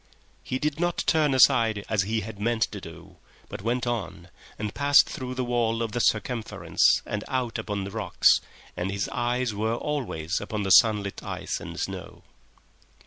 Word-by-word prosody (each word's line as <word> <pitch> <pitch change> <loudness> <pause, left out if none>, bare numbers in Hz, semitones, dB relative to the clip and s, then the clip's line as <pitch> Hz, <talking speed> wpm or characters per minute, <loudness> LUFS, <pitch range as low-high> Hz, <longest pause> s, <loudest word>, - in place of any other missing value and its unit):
He 130 - -3
did 150 +2 -2
not 175 0 0
turn 150 -4 +3
aside 115 -5 +4
as 110 -3 +1
he 110 +3 -1
had 105 0 -8
meant 115 +1 +1
to 105 - -7
do, 80 -2 -12 0.3
but - - -7
went 120 +4 -1
on 120 -6 -4 0.3
and 105 -1 -4
passed 145 0 +5
through 130 -1 -6
the 130 -1 -2
wall 115 -1 0
of 115 - -3
the 120 - -2
circumference 115 +1 +1
and 105 0 -4
out 125 -3 -2
upon 100 -2 -3
the 100 - -6
rocks, - - +3 0.3
and 90 +2 -2
his 100 +1 -2
eyes 120 -1 -1
were 110 +3 -1
always 115 - -3
upon 105 0 -3
the 95 - -1
sunlit 105 -1 +4
ice - - -4
and - - -8
snow. - - -6
115 Hz, 175 wpm, -26 LUFS, 105-125 Hz, 0.3 s, passed